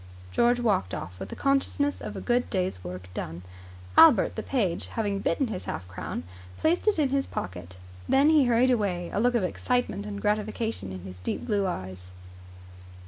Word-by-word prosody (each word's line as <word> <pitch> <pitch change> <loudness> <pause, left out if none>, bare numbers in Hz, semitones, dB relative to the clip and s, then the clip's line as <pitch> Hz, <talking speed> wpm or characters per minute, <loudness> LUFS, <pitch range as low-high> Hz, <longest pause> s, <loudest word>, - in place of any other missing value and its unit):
George 240 - +3
walked 200 - +1
off 90 0 -7
with 95 - -6
the - - -6
consciousness 275 +1 +1
of - - -6
a - - -5
good 245 0 +1
day's 185 - -1
work 90 +1 -7
done. 85 +1 -5 0.5
Albert 300 -11 +7
the 220 - -2
page, 205 -9 -1
having 205 -3 -2
bitten 195 +8 +1
his 190 -4 -5
half 90 - -5
crown, 85 -2 -5 0.3
placed 340 +6 +1
it 425 - +4
in 295 -4 +2
his 275 0 0
pocket. 90 0 -6 0.3
Then 280 +3 +5
he 300 -4 +5
hurried 245 +2 +4
away, 190 -7 0
a - - 0
look 245 +2 +3
of 230 - +2
excitement 210 +1 -1
and 200 -1 -5
gratification 215 - -1
in 95 -1 -7
his 90 0 -10
deep 90 - -3
blue 205 -4 +1
eyes. 95 - -6
205 Hz, 185 wpm, -27 LUFS, -, 0.5 s, Albert